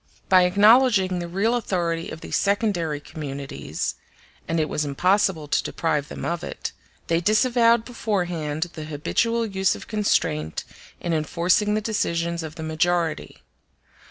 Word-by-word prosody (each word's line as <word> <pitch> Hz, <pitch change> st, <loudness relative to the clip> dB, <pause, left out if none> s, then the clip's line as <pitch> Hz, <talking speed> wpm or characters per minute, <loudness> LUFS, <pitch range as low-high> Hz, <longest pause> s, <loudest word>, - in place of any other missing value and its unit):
By 185 Hz, -1 st, +6 dB
acknowledging 205 Hz, -1 st, +5 dB
the 175 Hz, -, -4 dB
real 200 Hz, +7 st, +1 dB
authority 175 Hz, -8 st, -1 dB
of 160 Hz, -, -8 dB
these -, -, -4 dB
secondary 200 Hz, -7 st, 0 dB
communities 140 Hz, -2 st, -5 dB, 0.5 s
(and 165 Hz, 0 st, 0 dB
it 155 Hz, -, +1 dB
was 150 Hz, -, -1 dB
impossible 175 Hz, +2 st, +1 dB
to -, -, +2 dB
deprive 150 Hz, -3 st, -1 dB
them -, -, -7 dB
of 170 Hz, -1 st, -2 dB
it), -, -, -5 dB, 0.3 s
they 165 Hz, 0 st, +1 dB
disavowed 230 Hz, +3 st, +3 dB
beforehand 175 Hz, -9 st, -2 dB
the 155 Hz, -2 st, -7 dB
habitual 230 Hz, +10 st, 0 dB
use 195 Hz, -2 st, +1 dB
of -, -, -10 dB
constraint 80 Hz, -, 0 dB, 0.4 s
in 170 Hz, -, -2 dB
enforcing 170 Hz, +6 st, +1 dB
g 210 Hz, -, +2 dB
the 215 Hz, -, 0 dB
decisions 170 Hz, -6 st, -1 dB
of 160 Hz, -1 st, -7 dB
the 160 Hz, -, -7 dB
majority. 165 Hz, +1 st, -1 dB
175 Hz, 145 wpm, -24 LUFS, 160-210 Hz, 0.5 s, By